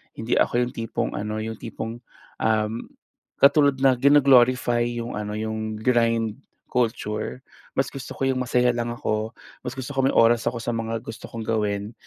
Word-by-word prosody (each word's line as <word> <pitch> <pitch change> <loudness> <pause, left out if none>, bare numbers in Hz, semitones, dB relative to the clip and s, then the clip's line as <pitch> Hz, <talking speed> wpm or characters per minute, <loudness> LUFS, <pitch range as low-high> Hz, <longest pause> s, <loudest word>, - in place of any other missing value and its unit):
hindi 110 +2 0
ako 120 +1 +2
yung 120 - -3
tipong 115 -1 -3
ano 105 +1 -3
yung 110 0 -5
tipong, 115 +1 -6 0.4
um, 110 +1 0 0.5
katulad 140 0 +5
na 135 -1 +6
gino-glorify 130 -4 +5
yung 120 0 -4
ano, 105 0 -4
yung 110 0 -3
grind 115 -1 +1 0.3
culture. 115 -1 -2 0.4
Mas 135 - +1
gusto 135 -1 -7
ko 135 - -2
yung 130 -1 0
masaya 125 0 +2
lang 120 0 -2
ako, 110 -1 -2 0.3
mas 125 - -4
gusto 130 +2 -5
ko 135 - +2
may - - +2
oras 115 0 +4
ako 120 0 -1
sa - - -3
mga 115 0 -2
gusto 110 - -8
kong 115 - -6
gawin 105 -1 -1
115 Hz, 170 wpm, -24 LUFS, 110-125 Hz, 0.5 s, na